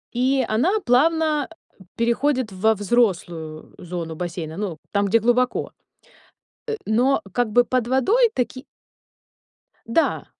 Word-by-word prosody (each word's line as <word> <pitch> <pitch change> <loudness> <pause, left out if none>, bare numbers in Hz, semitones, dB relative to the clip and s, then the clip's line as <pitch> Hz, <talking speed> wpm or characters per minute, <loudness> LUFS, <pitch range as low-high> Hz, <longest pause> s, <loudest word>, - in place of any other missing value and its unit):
и 260 +1 +2
она 330 - +2
плавно, 320 +6 +3 0.2
э, 325 -11 -20
переходит 240 0 0
во 220 +4 +2
взрослую 175 -8 -1
зону 170 -2 -6
бассейна, 165 -2 -5
ну, 195 -6 -4
там, 200 0 +1
где 225 +4 +3
глубоко. 245 +3 +1 1.0
Э, 450 - -1
но 245 +5 +2
как 245 +2 0
бы 245 +3 +4
под 245 -1 -1
водой 410 - +3
таки 255 +1 -3 1.2
Да. 230 +8 0
235 Hz, 120 wpm, -22 LUFS, 190-260 Hz, 1.2 s, бы